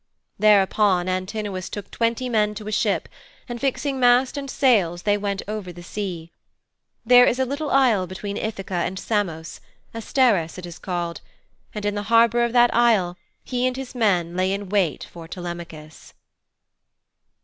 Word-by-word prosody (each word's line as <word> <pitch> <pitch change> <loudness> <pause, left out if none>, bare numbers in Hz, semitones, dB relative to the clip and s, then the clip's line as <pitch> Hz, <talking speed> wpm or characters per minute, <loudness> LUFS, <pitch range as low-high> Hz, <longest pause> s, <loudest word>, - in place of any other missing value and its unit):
Thereupon 200 -3 +3
Antinous 185 0 -3
took 205 -2 -7
twenty 230 +2 -1
men 210 -3 +1
to 210 0 -8
a - - -4
ship, 215 - 0 0.4
and 240 -2 -6
fixing 275 0 -1
mast 250 +2 +4
and 280 -1 -5
sails 195 - +2
they 205 -1 +2
went 200 -1 -3
over 210 -4 -5
the 175 0 -12
sea. 175 -4 -5 0.7
There 245 +1 +7
is 245 - +1
a 260 - +1
little 285 +3 -3
isle 235 -9 +3
between 200 +2 -6
Ithaka 200 -3 -5
and 190 - -3
Samos 180 -7 -3 0.3
Asteris 225 - +1
it 180 - -7
is 170 -1 -10
called 175 -2 -4 0.5
and 210 -1 -4
in 205 - 0
the 205 - -3
harbour 235 +1 +4
of 235 - 0
that 240 0 +4
isle 220 -7 +3 0.3
he 250 0 -1
and 255 0 -3
his 265 -2 -7
men 180 -8 +1
lay 185 +1 +1
in 200 -1 -4
wait 190 -6 0
for 165 -1 -11
Telemachus. 170 -3 -9
205 Hz, 160 wpm, -23 LUFS, 185-240 Hz, 0.7 s, There